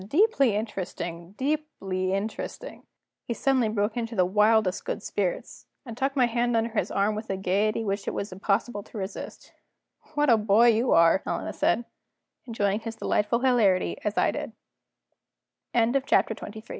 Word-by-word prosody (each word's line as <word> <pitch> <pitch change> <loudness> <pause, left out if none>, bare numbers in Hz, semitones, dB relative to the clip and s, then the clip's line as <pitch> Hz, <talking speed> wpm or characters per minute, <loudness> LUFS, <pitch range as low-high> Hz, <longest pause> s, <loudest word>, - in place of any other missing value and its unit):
Deeply 280 - +3
interesting! 185 -4 -5
deeply 260 -11 -2
interesting!" 215 - -4 0.5
He 235 - -2
suddenly 260 -4 +2
broke 210 0 -1
into 230 -1 -3
the 185 -3 +3
wildest 210 0 +2
good - - -4
spirits, - - -3 0.2
and 230 -3 -7
tucked 270 +3 -1
my 255 -3 +4
hand 240 0 0
under 225 +1 0
his 220 - -1
arm 200 +2 +1
with 215 +1 -6
a 195 - -1
gayety 200 +4 0
which 200 -1 -3
it - - -1
was 200 - -4
impossible 205 +3 -1
to 215 - -12
resist. 195 0 -7 0.6
"What 295 0 +2
a 230 - +6
boy 215 +3 +4
you 230 +2 +2
are!" 165 +3 +5
Helena - - -3
said, 240 - +1 0.6
enjoying 205 -3 0
his 225 0 -6
delightful 225 +1 0
hilarity 225 -8 +2
as 210 0 -2
I - - +3
did. - - -5 1.2
CHAPTER 240 0 +2
XXIV. 220 +1 -9
220 Hz, 155 wpm, -26 LUFS, 200-240 Hz, 1.2 s, a